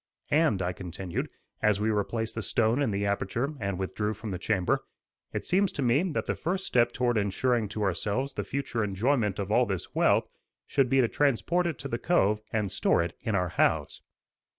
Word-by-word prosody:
"And," 145 - +3
I 90 +1 -1
continued, 90 0 -5 0.3
as 105 -2 +3
we 110 +1 +1
replaced 110 +2 -1
the 115 - -3
stone 115 +5 +1
in 135 - +2
the 100 0 -1
aperture 100 +8 -1
and 100 -3 -2
withdrew 105 +3 -2
from 110 0 -6
the 90 - -4
chamber, 95 -2 +1 0.5
"it - - -4
seems 190 +1 +2
to 140 - -2
me 125 +4 +3
that - - -1
the - - 0
first 185 +3 -2
step 120 -1 +3
toward 120 -2 +1
ensuring 110 +2 0
to 105 0 -3
ourselves 105 +8 -1
the - - -3
future 135 -5 -2
enjoyment 105 +1 +1
of 100 0 -3
all 120 +2 +4
this 95 -3 -4
wealth, - - +3 0.4
should 135 -3 +1
be 135 +1 +4
to 120 - +3
transport 145 +7 +1
it 165 - -3
to 140 - -6
the 120 -3 -3
cove 105 - +2
and 105 -3 -1
store - - +2
it 85 0 -4
in 110 - -1
our 90 -2 +1
house." - - +1
110 Hz, 200 wpm, -28 LUFS, 100-130 Hz, 0.5 s, all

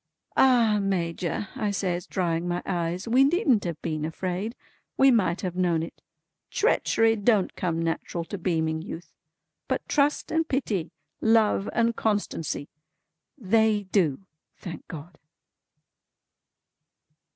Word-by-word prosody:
"Ah 235 -5 +4
Major" 180 0 -2
I 210 - -1
says 180 -3 -2
drying 170 -2 -1
my 175 0 -2
eyes, 175 +3 -2
"we 250 +4 +5
needn't 275 - +3
have 170 -3 -3
been 155 -1 -2
afraid. 185 +7 -3 0.4
We 270 0 +6
might 195 -7 +2
have 180 -2 -3
known 175 -3 +1
it. 165 - -9 0.5
Treachery 225 - +2
don't 210 -2 +2
come 170 -3 -1
natural 165 +1 -2
to 200 - -6
beaming 160 -3 0
youth; 165 0 -8 0.5
but - - -2
trust 290 0 +1
and 325 0 +1
pity, 215 - -1 0.3
love 220 -2 +3
and 230 0 +1
constancy, 200 -9 -2 0.7
they 220 -2 +2
do, 170 -6 +2 0.4
thank 170 -3 -8
God!" 160 0 -10
190 Hz, 120 wpm, -26 LUFS, 170-225 Hz, 0.7 s, We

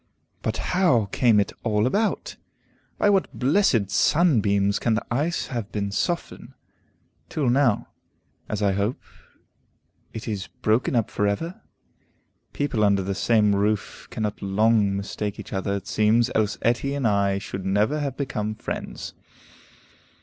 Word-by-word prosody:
But - - -2 0.2
how 130 - +3
came 115 -4 +4
it 100 - 0
all 105 -2 +1
about? 205 - 0 0.6
By 205 - +3
what 195 -2 +1
blessed 130 - +2
sunbeams 105 - +3
can 115 -2 +1
the 110 - -2
ice 155 +7 -1
have 115 -4 -4
been 100 -1 -2
softened, 170 - -3 0.8
till 140 -6 0
now, 130 -4 +2 0.6
as 105 -1 -2
I 100 - +3
hope, 100 +5 -1 1.1
it 110 - -7
is 100 -3 -3 0.2
broken 110 +4 +2
up 115 -3 +1
for 105 - 0
ever? 165 - -3 0.9
People 140 -7 -1
under 100 -2 +3
the 100 +1 -2
same 105 0 +3
roof 105 +1 -1
cannot 105 -1 -3
long 100 0 +2
mistake 100 +1 -4
each - - -8
other, 100 +1 -1
it 100 - -5
seems, 115 +3 +2
else 105 -1 +1
Etty 125 +4 +1
and 135 -4 +1
I 100 -2 +2
should 95 -1 -6
never 105 +10 +1
have 140 -3 -3
become 110 -6 -3
friends. - - -6
110 Hz, 140 wpm, -24 LUFS, 100-130 Hz, 1.1 s, came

